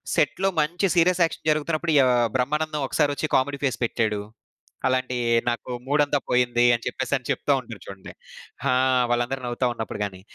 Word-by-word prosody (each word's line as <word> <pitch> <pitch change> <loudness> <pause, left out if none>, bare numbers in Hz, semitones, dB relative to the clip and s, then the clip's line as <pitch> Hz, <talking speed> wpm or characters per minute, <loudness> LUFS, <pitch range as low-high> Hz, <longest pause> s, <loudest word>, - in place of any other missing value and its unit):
సెట్‌లో 195 +1 +1
మంచి 170 +6 -1
serious 175 +1 +3
action 165 - -3
జరుగుతున్నప్పుడు 155 +2 -1
య - - +7 0.2
ఆహ్, 120 - +2
'బ్రహ్మానందం' 150 +3 -1
ఒకసారి 150 -2 +1
ఒచ్చి 155 - -2
కామెడీ 140 +2 -1
ఫేస్ 135 -3 0
పెట్టాడు. 110 -3 -1 0.7
అలాంటియి 130 -1 -1 0.2
"నాకు 120 +1 -2 0.2
మూడంతా 145 +1 +2
పోయింది" 120 -1 +2
అని 120 -1 -2
చెప్పేసి 130 +2 -3
అని 130 - -14
చెప్తా 145 - +1
ఉంటారు 115 -4 -11
చూడండి. 95 -1 -10 0.6
ఆ! - - +3 0.4
వాళ్ళందరూ 120 +2 -1
నవ్వుతా 120 +1 -2
ఉన్నప్పుడు 110 -2 -6
గానీ. 95 -2 -6
130 Hz, 160 wpm, -24 LUFS, 120-150 Hz, 0.7 s, య